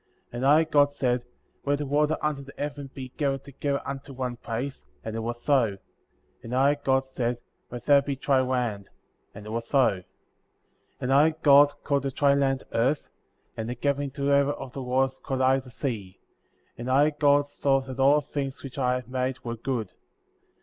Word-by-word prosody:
9. - - -5
And 130 - -1
I, 150 +3 +6
God, 145 -2 +3
said: 125 -2 0 0.4
Let 145 0 +1
the 145 - -3
water 150 +2 +1
under 150 -2 -1
the 140 0 -12
heaven 145 -1 -5
be 130 -1 -8
gathered 135 -2 -1
together 140 0 -3
unto 140 0 -6
one 125 -1 -3
place, 120 - -5 0.2
and 110 0 -5
it - - -2
was 120 +1 -4
so; 120 -9 +2 0.6
and 115 +2 -5
I, 135 +2 +4
God, 135 -2 +1
said: 125 -2 -2 0.3
Let 120 -1 -8
there 140 -1 +6
be 140 0 -3
dry 135 -1 +2
land; 120 -6 -2 0.5
and 105 0 -10
it 110 - -7
was 115 +1 -3
so. 135 -5 +4
10. 90 - -12 1.0
And 130 +1 +1
I, 155 +3 +5
God, 145 0 +7
called 140 -1 +1
the 135 - -2
dry 140 +1 +3
land 135 -1 +1
Earth; 130 +6 +1 0.5
and 115 0 -4
the 125 - -3
gathering 140 +2 -1
together 140 +1 +2
of 135 -3 -8
the 135 - -5
waters 130 +1 0
called 130 -1 -3
I 130 +1 +4
the 130 -1 -12
Sea; 110 -7 -5 0.6
and 120 +2 -4
I, 145 +4 +4
God, 145 -1 +3
saw 140 -1 +1
that 130 0 -8
all 140 +3 +5
things 140 -2 -5
which 135 0 -7
I 125 -1 +2
had 125 -2 -5
made 130 0 -2
were 115 -1 -4
good. 115 -4 -3
135 Hz, 195 wpm, -26 LUFS, 125-140 Hz, 1.0 s, God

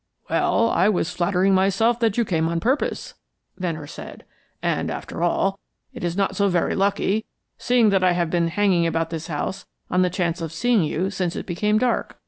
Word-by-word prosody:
"Well, 230 0 +2
I 185 +5 +3
was 180 -5 0
flattering 185 +2 +2
myself 195 +5 +2
that 225 -3 +1
you 235 - +2
came 165 -4 0
on 170 0 -1
purpose," 260 - -1 0.5
Venner 165 -5 -3
said. - - -10 0.4
"And, - - -1
after - - -6
all, 195 +3 +1 0.3
it - - -8
is 175 +1 -2
not 195 -1 0
so 200 -1 +2
very 175 -2 +1
lucky, 200 +2 +1 0.4
seeing 240 -3 +3
that 190 -1 +2
I 180 -1 +4
have 170 -2 -1
been 170 -1 +1
hanging 180 -1 +2
about 165 0 -1
this 165 -1 -5
house 175 +4 -4 0.2
on 180 - +3
the 180 - +3
chance 175 -1 -2
of 165 -2 -4
seeing 235 +6 +2
you 175 +4 -1
since 180 -3 -2
it - - -5
became 210 +4 0
dark. 245 +1 -1
185 Hz, 195 wpm, -23 LUFS, 170-205 Hz, 0.5 s, I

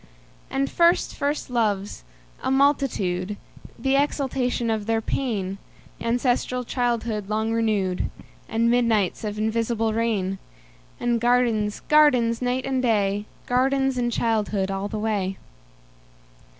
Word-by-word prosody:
And 275 +1 0
first 340 +3 +3
first 290 +2 -2
loves, 205 - -1 0.4
a - - -1
multitude, 225 -9 +1 0.4
The 270 0 +1
exaltation 265 -4 0
of 215 -2 -2
their 225 0 +2
pain; 205 -5 -2 0.4
Ancestral 245 +1 0
childhood 230 -4 -1
long 220 +1 0
renewed; 210 -5 0 0.4
And 230 +1 +2
midnights 230 -6 +1
of 210 -1 -3
invisible 225 +1 0
rain; 205 -4 -1 0.6
And 240 -1 0
gardens, 235 -4 +2
gardens, 255 -7 +4
night 250 +1 -1
and 265 -1 0
day, 205 -4 +1 0.2
Gardens 270 +1 +2
and 240 -1 0
childhood 210 -4 0
all 195 +1 -2
the 215 - -5
way. 205 -3 -1
230 Hz, 115 wpm, -24 LUFS, 210-250 Hz, 0.6 s, gardens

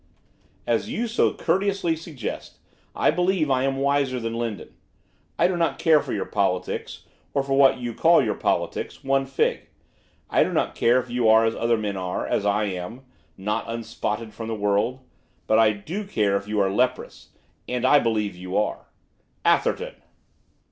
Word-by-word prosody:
'As - - 0
you 240 - -2
so 230 - +2
courteously 195 -3 0
suggest, 155 -8 -7 0.4
I - - +3
believe 175 -3 +1
I 130 -1 +2
am 135 0 0
wiser 140 -2 +1
than 115 -1 -3
Lindon. 115 -4 -4 0.6
I 175 - +4
do 185 - -1
not 170 -1 0
care 160 -3 +4
for - - -6
your 100 - -2
politics, 90 -3 -2 0.3
or 140 - +2
for 135 0 -2
what 135 -1 +5
you 120 -2 -4
call 165 +8 +5
your 110 -3 0
politics, - - -2
one 135 0 +1
fig. 135 - 0 0.6
I - - +3
do - - -2
not - - 0
care 120 +2 +3
if 125 -1 -7
you 120 -2 +2
are 110 +1 +6
as 115 - 0
other 115 0 +1
men 105 -2 -3
are, 90 -1 -3
as 105 - 0
I 105 +1 +2
am, 100 +5 -5 0.4
not 105 +2 -2
unspotted 115 -1 -4
from 115 +1 -7
the 115 - -2
world! 105 +5 0 0.4
But 110 - +3
I 110 -1 +5
do 155 - -5
care 105 - 0
if 100 0 -2
you 105 0 -1
are 95 -1 +1
leprous. 125 +6 -1 0.4
And 125 0 -1
I 145 +3 +6
believe 110 -5 -1
you 90 +1 -4
are.' 105 - -1 0.6
'Atherton! - - +1
115 Hz, 175 wpm, -24 LUFS, 105-140 Hz, 0.6 s, are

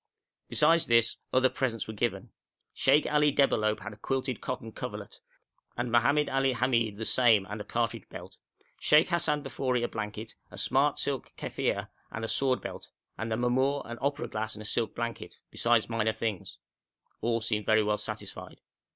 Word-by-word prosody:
Besides 165 +2 +4
this, 115 0 +4
other 130 0 +5
presents 130 -5 -2
were 110 - -5
given. 105 -3 -2 0.4
Sheikh 140 +3 +4
Ali 150 0 +3
Debalohp 110 -7 +2
had 110 - -7
a - - -14
quilted 130 0 -2
cotton 115 - -5
coverlet, - - -7 0.6
and 120 0 -2
Mohammed 140 +6 +3
Ali 135 0 +1
Hamid 115 -4 +1
the 110 - -4
same 115 -6 +4
and 105 +2 -6
a - - -4
cartridge 115 +1 -2
belt; - - -10 0.4
Sheikh 150 +3 +5
Hassan 165 -4 +2
Bafori 130 -2 -1
a - - +1
blanket, 110 0 -5 0.2
a - - -12
smart - - +2
silk - - -2
keffieh - - -2 0.2
and 115 0 -4
a - - -3
sword 130 +2 +1
belt; - - -7 0.3
and 115 0 -4
the 110 - 0
mamour 130 +4 +1
an 120 0 -7
opera 145 +2 -1
glass 110 0 -3
and 110 - -8
a - - -11
silk 115 +2 -1
blanket, 115 0 -5
besides 115 -1 +2
minor 110 -1 0
things; 110 -3 -4 0.6
all 115 0 +1
seemed 110 -2 -2
very 110 0 +4
well 105 0 0
satisfied. - - -6
120 Hz, 175 wpm, -29 LUFS, 110-135 Hz, 0.6 s, other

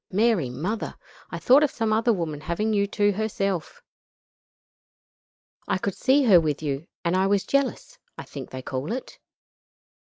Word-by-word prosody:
Mary 205 - +2
Mother! 180 - -4 0.3
I - - -5
thought 265 +4 +5
of 300 - +3
some 225 -3 -1
other 225 +2 +3
woman 165 -7 -2
having 190 +8 -1
you 200 -1 +2
to 205 0 +2
herself. 195 -4 -3 1.8
I - - +1
could 195 +1 -2
see 275 +7 +3
her 195 -9 +6
with 155 -1 -2
you, 145 +2 -3 0.2
and 170 +2 +2
I 190 +1 +2
was 200 -1 +2
jealous 280 - -1 0.2
I - - -6
think - - -9
they 130 0 -7
call 130 +6 -4
it. 260 - -7
200 Hz, 160 wpm, -25 LUFS, 165-225 Hz, 1.8 s, her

